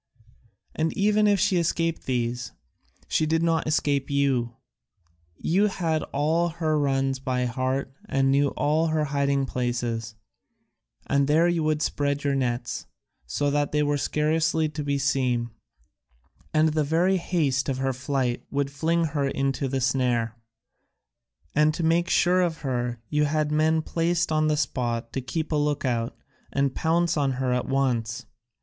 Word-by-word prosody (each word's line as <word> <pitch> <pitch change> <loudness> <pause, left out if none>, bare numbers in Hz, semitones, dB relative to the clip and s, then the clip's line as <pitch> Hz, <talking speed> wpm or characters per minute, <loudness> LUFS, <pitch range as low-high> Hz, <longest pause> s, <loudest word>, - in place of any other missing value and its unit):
And 160 +1 0
even 210 +1 +3
if 205 -1 +3
she 185 - +2
escaped 165 -1 0
these, 120 -2 -2 0.5
she 155 - +1
did 160 +1 +1
not 165 -2 +1
escape 145 -3 0
you; 135 -4 +1 0.8
you 195 +5 +2
had 165 -5 -1
all 160 +4 +1
her 160 -2 0
runs 135 -1 0
by 125 -1 -1
heart 130 +2 -2 0.2
and 135 0 +2
knew 140 +1 +3
all 155 +3 +2
her 155 -1 +1
hiding 140 -1 +1
places, 120 -3 -2 0.9
and 140 0 +2
there 160 +4 +4
you 170 -2 +1
would 155 0 +1
spread 145 0 -1
your 140 -1 +1
nets, 120 -2 -2 0.4
so 140 - 0
that 145 0 0
they 150 0 +2
were 145 0 +1
scarcely 155 +2 +1
to 150 0 -5
be 140 0 0
seen, 125 -4 0 1.0
and 155 +1 +3
the 155 0 +1
very 170 +6 +2
haste 145 -7 0
of 130 - -1
her 135 0 0
flight 130 -2 -2
would 140 0 -1
fling 165 +4 +1
her 140 -2 0
into 135 0 -1
the 135 0 -1
snare. 125 -3 +1 1.2
And 150 +1 +3
to 170 - -3
make 170 +2 +2
sure 180 +1 +3
of 170 -3 -1
her 120 -3 -2
you 150 0 +2
had 150 0 0
men 155 +1 +2
placed 165 0 0
on 155 0 +2
the 150 -1 +1
spot 120 -5 -2
to 135 - -2
keep 155 +7 -4
a - - +1
look 145 -1 0
out, 120 -1 -1 0.3
and 140 -1 +1
pounce 165 +1 +1
on 140 -2 +1
her 130 -1 -1
at 125 - -1
once. 120 -5 0
145 Hz, 160 wpm, -25 LUFS, 130-160 Hz, 1.2 s, there